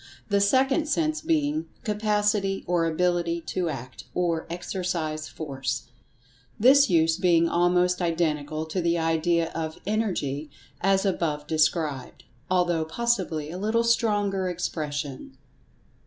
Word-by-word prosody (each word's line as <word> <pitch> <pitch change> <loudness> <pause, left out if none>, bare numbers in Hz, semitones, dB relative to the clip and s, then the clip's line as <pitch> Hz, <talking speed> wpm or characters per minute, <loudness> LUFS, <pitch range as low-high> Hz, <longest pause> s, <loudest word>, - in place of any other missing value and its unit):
the 200 -1 +3
second 265 +8 +3
sense 310 0 0
being 315 -1 0 0.2
"Capacity 210 -2 0
or 175 -2 +1
Ability 170 0 0
to 175 +1 -2
Act, 130 -3 -7
or 170 -2 0
exercise 170 -3 -3
Force," 135 -5 -4 0.7
this 270 +4 +6
use 165 -2 +3
being 170 -2 +3
almost 180 +1 +2
identical 155 -3 -1
to 170 +3 -2
the 170 0 +1
idea 165 +1 +1
of 160 -1 -4
"Energy," 175 -9 -1 0.3
as 195 +1 +2
above 155 -6 -1
described, 155 -3 0 0.3
although, 175 -3 +2
possibly, 165 -5 -1
a 180 - -6
little 220 +3 +1
stronger 205 -5 +1
expression. 150 -6 -4
175 Hz, 115 wpm, -26 LUFS, 160-205 Hz, 0.7 s, this